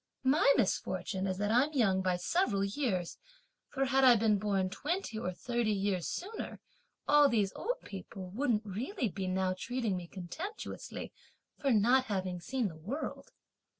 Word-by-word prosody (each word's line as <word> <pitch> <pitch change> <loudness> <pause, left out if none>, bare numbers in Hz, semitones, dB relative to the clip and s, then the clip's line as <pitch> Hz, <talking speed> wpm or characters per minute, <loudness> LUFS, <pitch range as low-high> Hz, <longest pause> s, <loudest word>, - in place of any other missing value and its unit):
My 280 +1 +5
misfortune 190 -3 0
is 185 -1 -2
that 205 +2 0
I'm 265 +7 +3
young 195 -8 +3
by 185 -1 +1
several 200 - +1
years; 200 - -1 0.5
for 270 -1 0
had 270 0 +3
I 250 -2 +8
been 215 -2 +3
born 195 -2 0
twenty 295 - -2
or 185 - -2
thirty 235 +5 -1
years 195 -3 0
sooner, 420 +5 -5 0.5
all 295 -1 +6
these 210 -5 +1
old - - -2
people 190 -1 -8
wouldn't 230 -1 0
really 235 - -2
be 190 +1 -4
now 185 0 +1
treating 230 0 -2
me 175 -1 -5
contemptuously 255 - -6 0.5
for 280 - +1
not 245 +4 +4
having 185 -4 -2
seen 240 +5 -1
the 165 - -8
world! 210 - -5
210 Hz, 155 wpm, -32 LUFS, 190-265 Hz, 0.5 s, I